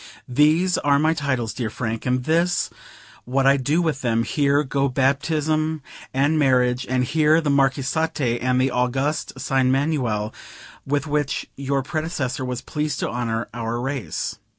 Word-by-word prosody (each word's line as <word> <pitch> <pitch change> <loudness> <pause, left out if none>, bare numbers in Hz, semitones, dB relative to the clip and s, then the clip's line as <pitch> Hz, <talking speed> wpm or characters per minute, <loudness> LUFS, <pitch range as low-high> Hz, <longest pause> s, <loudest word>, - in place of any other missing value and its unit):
These 155 +8 +3
are 140 -1 +3
my 155 +2 +3
titles, 130 -7 -2
dear 120 -4 -3
Frank, 115 +1 -4
and 125 0 +1
this 170 +5 +1 0.5
what 135 +2 +1
I 135 +1 +6
do 145 +6 +1
with 155 -4 -1
them: 115 -2 +1
here 145 +2 +2
go 140 0 0
Baptism 155 +3 0 0.3
and 145 +4 +2
Marriage, 125 -2 +2
and 130 0 +1
here 155 +4 +3
the 150 -3 0
Marquisate 135 -1 +1
and 125 +1 +1
the 130 +1 +2
August 135 +5 -1
Sign 130 -2 +1
Manual, 130 -7 0 0.5
with 145 0 0
which 145 -2 -1
your 140 0 -1
predecessor 155 -4 -3
was 125 -1 -3
pleased 150 0 -3
to - - -1
honor 115 -1 -2
our 115 0 -3
race." 135 0 -3
135 Hz, 150 wpm, -22 LUFS, 125-150 Hz, 0.5 s, I